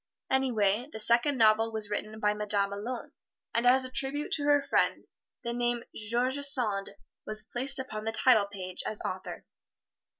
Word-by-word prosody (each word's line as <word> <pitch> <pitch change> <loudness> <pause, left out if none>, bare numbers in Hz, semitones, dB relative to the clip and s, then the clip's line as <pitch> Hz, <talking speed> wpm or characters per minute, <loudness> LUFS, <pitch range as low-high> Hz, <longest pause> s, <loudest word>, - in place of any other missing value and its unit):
Anyway, 245 -2 +1
the - - -7
second 240 +6 +4
novel 225 0 +3
was 215 -2 -4
written 215 +1 -4
by 210 -1 +2
the 210 - -10
Madame 205 -1 -1
alone, 230 +4 -6 0.4
and 235 +1 +1
as 260 +1 +4
a 255 - -9
tribute 275 +3 -2
to 290 - 0
her 290 -1 +3
friend - - 0 0.4
the 235 - -3
name 240 0 -1
"George 240 +5 0
Sand" 245 -8 +2 0.3
was 215 0 +1
placed 270 +3 +2
upon 215 -5 -4
the 225 - -1
title 225 -2 +3
page 185 -2 -6
as 215 - -4
author. 185 0 -6
230 Hz, 170 wpm, -29 LUFS, 210-260 Hz, 0.4 s, second